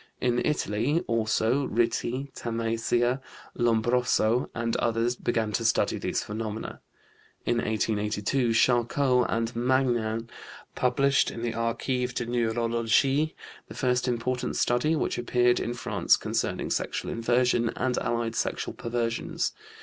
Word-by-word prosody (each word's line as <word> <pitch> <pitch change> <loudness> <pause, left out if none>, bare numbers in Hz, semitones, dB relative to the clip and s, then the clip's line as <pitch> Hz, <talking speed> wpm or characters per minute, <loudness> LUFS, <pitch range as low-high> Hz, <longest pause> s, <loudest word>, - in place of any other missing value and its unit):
In 125 -1 +1
Italy, 145 - 0
also, 115 +4 +1
Ritti, 120 +4 -1
Tamassia, 115 +2 0 0.3
Lombroso, 120 0 +2
and 115 -1 -1
others 115 +1 0
began 115 -3 -1
to 115 - -1
study 110 0 +1
these - - -1
phenomena. 110 +1 -5 0.6
In 120 - +1
1882 110 +3 0
Charcot 125 +2 +3
and 115 +1 -1
Magnan 120 -2 +1 0.5
published 135 +2 +2
in 115 - -7
the 120 -1 -1
Archives 125 +2 -1
de - - -1
Neurologie 120 +5 +1 0.3
the - - -10
first 125 -1 +1
important 125 +1 -1
study 125 +7 +2
which 155 - -1
appeared 120 0 +2
in 120 - -3
France - - +2
concerning - - -2
sexual - - -2
inversion 120 0 +2
and 125 -1 0
allied 115 -1 -1
sexual - - -2
perversions. 115 0 -2
120 Hz, 120 wpm, -27 LUFS, 115-125 Hz, 0.6 s, Charcot